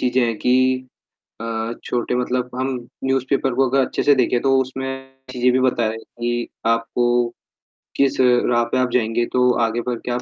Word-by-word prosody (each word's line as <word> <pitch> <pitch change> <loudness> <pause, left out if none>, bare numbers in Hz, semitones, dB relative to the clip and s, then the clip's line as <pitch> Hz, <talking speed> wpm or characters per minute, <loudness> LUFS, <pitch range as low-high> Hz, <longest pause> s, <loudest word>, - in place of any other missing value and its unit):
चीज़ें 125 0 +2
हैं 115 -1 -1
कि 130 +1 +2 0.5
अ, 115 0 -3
छोटे 120 0 -1
मतलब 125 0 -1
हम 130 +1 -1 0.4
न्यूज़ 135 -1 +1
पेपर 135 -2 +1
को 135 +1 +2
अगर 135 +2 +2
अच्छे-से 145 - +2
देखें 125 -1 +1
तो 135 - +2
उसमें 130 +1 -4 0.5
चीज़ें 125 0 +2
भी 130 - +2
बताएँ 120 -3 +1
कि 120 +1 -4 0.2
आपको, 120 +1 +1 0.7
किस 140 -1 +2
राह 125 -1 +3
पे - - +1
आप 130 - +1
जाएँगे 115 0 +1
तो 125 0 +4 0.2
आगे 115 +1 -2
बढ़ 120 -2 -2
के 125 - -2
आप 120 0 -1
125 Hz, 175 wpm, -21 LUFS, 120-130 Hz, 0.7 s, तो